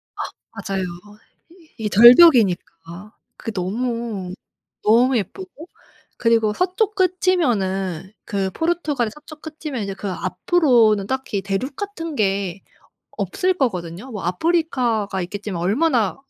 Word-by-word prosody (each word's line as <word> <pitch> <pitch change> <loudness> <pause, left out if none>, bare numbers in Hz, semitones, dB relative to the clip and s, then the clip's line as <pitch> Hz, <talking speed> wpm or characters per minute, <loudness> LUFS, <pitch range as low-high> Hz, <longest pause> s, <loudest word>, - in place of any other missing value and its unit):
아 - - -17 0.5
맞아요. 195 -1 -1 0.7
이 330 -10 -12
이 - - 0
절벽이니까 210 - +5 0.2
그게 225 - -5
너무, 215 0 -3 0.5
너무 245 +4 +4
예쁘고. 345 - -7 0.5
그리고 230 -2 +2
서쪽 370 - 0
끝이면은 220 - 0
그 195 -3 -2
포르투갈의 305 - -1
서쪽 300 0 -14
끝이면 305 -5 -6
이제 195 -1 -4
그 195 -1 -5
앞으로는 220 - +2
딱히 260 -6 -3
대륙 200 +8 -3
같은 330 -5 -6
게 195 -4 -1 0.6
없을 375 -2 0
거거든요. 195 - -3
뭐 210 -5 -6
아프리카가 235 - 0
있겠지만 190 -1 -5
얼마나 230 - +1
230 Hz, 270 characters per minute, -21 LUFS, 195-315 Hz, 0.7 s, 절벽이니까